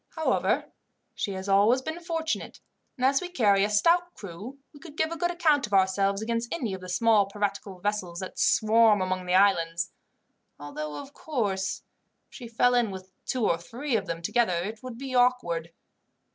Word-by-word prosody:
However, 320 -1 0 0.4
she 200 - -3
has 190 +1 -6
always 210 +6 +4
been 315 +4 -4
fortunate, 330 -2 -3 0.4
and 255 - 0
as 270 +1 +3
we 360 - -5
carry 205 - +3
a 205 - +1
stout 340 +12 +2
crew 205 +8 -9 0.2
she 290 - -14
could 305 -1 -13
give 315 +1 0
a - - -3
good 345 +1 0
account 315 -7 +2
of 210 - -11
herself 195 +1 +2
against 230 +1 -2
any 245 - -2
of 190 - -6
the 185 - -9
small 210 +1 +3
piratical 200 -1 -3
vessels 190 -3 -2
that 185 - -7
swarm 220 -1 +4
among 185 -1 -2
the 180 - +2
islands, 175 -3 +2 0.7
although, 150 +1 -6
of 275 - -10
course, 205 -13 -2 0.5
if - - -26
she 245 - -9
fell 240 +2 +2
in 240 -3 +2
with 190 -1 -9 0.2
two 255 -4 0
or 165 - +1
three 240 +9 -4
of 200 -3 -1
them 170 0 -4
together 220 0 +1
it 215 +3 -6
would 255 -2 -8
be 265 0 -6
awkward." 245 -10 +1
215 Hz, 185 wpm, -27 LUFS, 190-260 Hz, 0.7 s, always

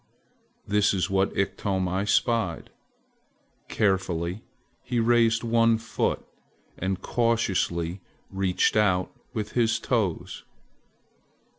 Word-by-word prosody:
this 105 0 +2
is 95 +1 -1
what 95 0 +2
Iktomi 95 0 -1
spied. 115 -8 0 1.0
Carefully 95 -2 0 0.4
he 120 - -2
raised 115 0 +3
one 115 -1 +3
foot 115 0 -2 0.5
and 95 +1 -3
cautiously 95 -7 0 0.3
reached 95 0 +1
out 95 -4 +2 0.2
with 105 -1 -3
his 115 -2 +2
toes. 110 -8 -2
100 Hz, 90 wpm, -26 LUFS, 95-115 Hz, 1.0 s, raised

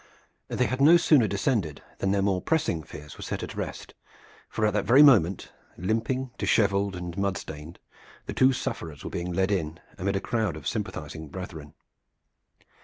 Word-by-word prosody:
They 125 - 0
had 130 +2 -2
no 160 +5 +8
sooner 145 -8 +4
descended 100 - -1 0.2
than 95 - 0
their 100 0 +2
more 95 -2 +1
pressing 160 - 0
fears 75 -1 -11
were - - -10
set - - -4
at - - -6
rest, - - -6 0.6
for 110 - 0
at 105 - +1
that 105 - +1
very 135 +5 +7
moment, 100 - +4 0.3
limping, 115 +7 -1
disheveled 100 -2 +2
and 90 -1 -6
mud 100 -1 0
stained, 80 +1 -9 0.5
the - - -5
two 130 +1 +5
sufferers 80 - -5
were - - -6
being 90 +1 -3
led 95 +3 +1
in 85 -4 -2 0.2
amid 100 +1 -1
a - - +1
crowd 110 -5 -1
of 75 -2 -7
sympathizing 80 -7 -4
brethren. 80 -4 -8
100 Hz, 175 wpm, -27 LUFS, 85-115 Hz, 0.6 s, no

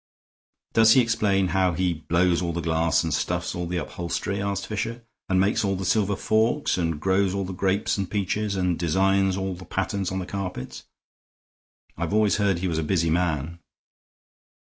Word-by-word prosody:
"Does 115 0 +6
he 130 - +6
explain 105 -5 +1
how 95 0 +2
he 90 0 0
blows 85 +3 +1
all 85 -1 -2
the 85 - -2
glass 80 0 +1
and 80 -2 -2
stuffs - - -1
all 90 -1 -3
the 90 +1 -2
upholstery," 90 +4 -3
asked 100 -1 -2
Fisher, 115 +3 -4 0.3
"and 95 -1 +3
makes 100 +3 +2
all 100 -1 0
the 95 0 -4
silver 100 +1 +1
forks, 110 +9 +1
and 80 -4 -1
grows 95 +2 +1
all 100 -1 -1
the 95 - -5
grapes 95 +2 0
and 95 -2 -2
peaches, 105 0 -1
and 90 -3 0
designs 95 +3 +2
all 95 0 -2
the 90 +1 -10
patterns 95 0 -2
on 95 - -3
the 95 - -3
carpets? 90 -9 -6 1.1
I've 85 +4 -2
always 105 -1 +3
heard 100 -4 +2
he 90 +2 -2
was 80 -2 -1
a - - -1
busy 85 0 +1
man." 85 -1 -1
95 Hz, 185 wpm, -25 LUFS, 85-100 Hz, 1.1 s, Does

